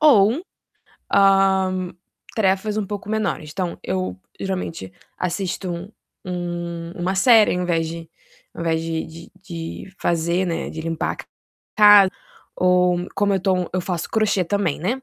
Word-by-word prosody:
ou, 255 - +5 0.7
hã, 190 -2 +3 0.4
tarefas 205 0 +1
um 210 - -1
pouco 205 +1 -6
menores. 195 -8 -2
Então 180 -1 -3
eu 95 -1 -2 0.2
geralmente 180 - -4 0.3
assisto 180 +1 -2
um 175 +4 -7 0.4
um 175 -2 -4
uma 185 +2 -1
série 220 -1 +6
ao 180 - -1
invés 165 -2 0
de 165 0 -7 0.4
ao - - -7
invés 165 -1 0
de 165 -1 -3
de 165 +1 -12
de 175 +1 -7
fazer, 170 +2 +1
né, 170 -2 -2
de 160 - -6
limpar 165 0 -2
a - - -11
casa - - -11 1.3
ou 180 -1 +3
como 200 0 +2
eu 190 - 0
tô 190 0 +2 0.2
eu 185 - 0
faço 175 -2 -3
crochê 215 -4 +2
também, 195 -4 0
né, 235 +11 -2
180 Hz, 150 wpm, -22 LUFS, 170-195 Hz, 1.3 s, série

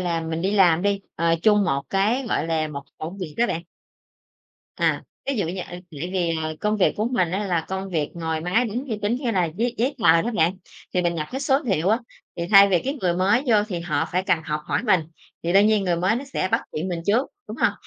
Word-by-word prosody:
là 170 -2 -1
mình 160 +1 -3
đi 195 - +1
làm 180 -4 +4
đi, 200 -1 +1 0.2
ờ, 165 0 +2
chung 210 -2 +4
một 140 -2 0
cái, 220 +7 +1
gọi - - 0
là, 160 -1 0
một 140 -2 -6 0.2
công 170 +6 -6
việc 160 -5 -6
đó 240 +1 +3
bạn. 170 -2 -3 1.1
À, - - +1 0.3
ví 275 - 0
dụ 200 -7 0
như, 185 +1 -4
a, - - -6
tại 175 0 -8 0.3
vì, 170 -3 0
à, 155 - -2
công 210 +1 +1
việc 195 - +3
của 215 +3 0
mình 180 -7 +1
á 200 +3 -1
là 170 -3 0
công 190 0 -4
việc 155 -4 -1
ngồi 160 -2 -2
máy 185 +9 +1
tính, 245 +6 -3
vi 215 -2 -2
tính, 210 +3 +1
như 250 -3 -2
là 185 -4 +2
giấy 225 +9 -2
giấy 255 +5 +1
tờ 165 +1 +6
đó 235 - -2
bạn, 170 +1 +3 0.4
thì 180 - +2
mình 170 0 0
nhập 155 -2 -3
cái 265 - -3
số 275 -1 +3
liệu 190 -6 +1
á, 220 +3 +3 0.4
thì 170 - -3
thay 200 -1 +8
vì 180 - +3
cái 275 +3 -2
người 175 -2 +1
mới 200 +8 +2
vô 230 - +4
thì 175 -3 -3
họ 160 -2 -1
phải 185 +1 +1
cần 170 - +2
học 150 0 -2
hỏi - - -1
mình, 195 -7 +3 0.4
thì 170 +1 -1
đương 200 +2 +6
nhiên 215 -2 +2
người 175 -2 +1
mới 185 +6 +1
nó 275 - -4
sẽ 270 -8 -2
bắt - - +3
chuyện 165 +5 -3
mình 175 -2 -3
trước, 230 +7 +3 0.2
đúng - - -6
hông? - - +2
185 Hz, 260 wpm, -23 LUFS, 165-215 Hz, 1.1 s, thay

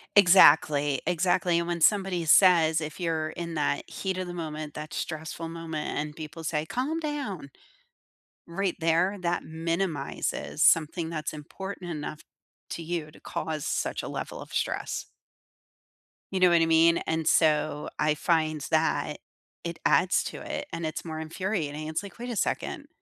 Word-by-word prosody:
Exactly, 150 -7 +6
exactly, 175 0 +2
and 170 0 0
when 170 -1 -2
somebody 190 -2 +3
says 160 -2 +6
if 155 +3 -6
you're 160 -2 -1
in 170 0 -6
that 145 -1 -1
heat 190 -1 -3
of 185 - -3
the 175 - -6
moment, 155 -3 -5
that 150 0 -7
stressful 160 +1 -4
moment, 165 -2 -4
and 150 0 -3
people 160 +1 -8
say, 155 0 -1
"Calm 290 - -1
down," 275 - -4 1.0
right 185 +1 -1
there, 170 +5 +2
that 175 -1 -1
minimizes 165 -1 -2
something 160 +1 +3
that's 155 -2 -3
important 175 +4 -7
enough 150 0 -6 0.5
to 170 - -4
you 160 -2 -4
to - - -17
cause 155 -2 -4
such - - -1
a - - -5
level - - -5
of - - -12
stress. - - -2 1.3
You 190 - +1
know 180 -1 +6
what 170 -1 +5
I - - +4
mean? 165 +1 +5
And 160 -1 -1
so, 150 -2 +2
I 150 0 +2
find 155 -1 +1
that, 155 -1 +1 0.5
it 170 -1 -4
adds 185 - +4
to - - -6
it, - - -4
and 165 - -4
it's 155 +2 -4
more 160 -1 -5
infuriating. 160 -2 -3
It's 160 +3 -2
like, 200 - -10
"Wait 245 +1 -5
a - - -3
second. - - -2
165 Hz, 160 wpm, -27 LUFS, 155-180 Hz, 1.3 s, Exactly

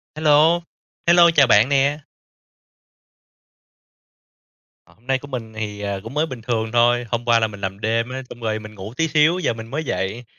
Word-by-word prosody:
Hello. 155 +2 +4 0.4
Hello, 170 0 +6
chào 140 -4 +6
bạn 110 +3 +5
nè. 140 +1 +2 2.9
À, - - -23
hôm 120 +3 -29
nay 135 0 +1
của 145 - -11
mình 120 -5 -7
thì, 105 -2 -6
ờ, 100 -1 -4
cũng 115 +3 -9
mới 150 +2 +1
bình 130 -7 -8
thường 110 -1 -2
thôi, 120 +1 +3
hôm 120 0 -2
qua 120 -1 +4
là 110 - +1
mình 100 -1 -11
làm 95 +1 -4
đêm 115 +2 -1
á, 130 +1 -5
xong 120 - -11
rồi 110 -1 -2
mình 110 0 -11
ngủ 100 +3 -9
tí 165 - +1
xíu, 155 +3 +3
giờ 180 - 0
mình 110 0 -9
mới 155 +3 -3
dậy. 110 -3 -3
120 Hz, 195 wpm, -21 LUFS, 110-145 Hz, 2.9 s, Hello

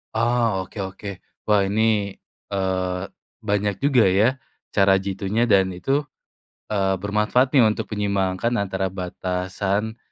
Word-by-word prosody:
Oh, 115 -4 +1
oke - - -15
oke. 95 +2 -8 0.4
Wah 105 -2 +4
ini, 105 -2 +2 0.4
eee, 95 -2 -1 0.5
banyak 105 0 +1
juga 135 -4 +4 0.2
ya, 120 +5 +4 0.4
cara 95 -1 +5
jitunya 100 +4 -1
dan 95 -3 +4
itu, 135 +12 0 0.7
eee, 95 -2 +1
bermanfaat 105 +6 +2
nih 125 - +7
untuk 110 -1 0
menyeimbangkan 100 +1 0
antara 95 -3 -1
batasan 95 +4 -2
100 Hz, 120 wpm, -23 LUFS, 95-110 Hz, 0.7 s, nih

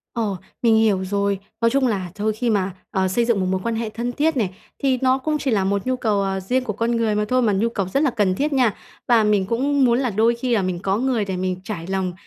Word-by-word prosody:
Ồ, 215 -5 -1 0.2
mình 230 -2 +4
hiểu 215 -4 +3
rồi. 200 0 0 0.2
Nói 230 - +4
chung 270 0 +2
là 190 -6 -2
thôi, 215 +1 -1
khi 240 +2 -1
mà, 195 -3 0 0.2
ờ, 190 0 +1
xây 235 +6 +1
dựng 230 -4 +1
một 185 - 0
mối 185 0 -1
quan 230 -1 -1
hệ 225 -1 -2
thân 235 +3 -3
thiết 300 +3 0
này, 195 -6 -1 0.3
thì 265 -2 +3
nó 260 0 +3
cũng 305 +3 -1
chỉ 275 -3 -2
là 205 -4 +2
một 200 0 -1
nhu 255 - +1
cầu, 215 -5 0
à, 190 0 -1
riêng 250 +8 0
của 215 - -3
con 230 +3 -1
người 225 -2 +1
mà 210 0 +1
thôi, 255 0 +3
mà 220 -4 +2
nhu 215 +4 +1
cầu 200 -5 -2
rất 275 +11 0
là 295 - +3
cần 205 -6 +1
thiết 290 +7 -1
nha. 250 -6 +3 0.3
Và 235 -3 +5
mình 210 -2 +2
cũng 270 +6 +1
muốn 240 0 +3
là 260 -2 0
đôi 225 +3 +2
khi 245 +1 -1
là 210 - +2
mình 185 -2 -2
có 195 +2 0
người 245 -3 0
để 190 -2 -3
mình 185 0 -2
trải 185 -5 -6
lòng, 190 -1 -1
220 Hz, 285 wpm, -22 LUFS, 195-245 Hz, 0.3 s, Và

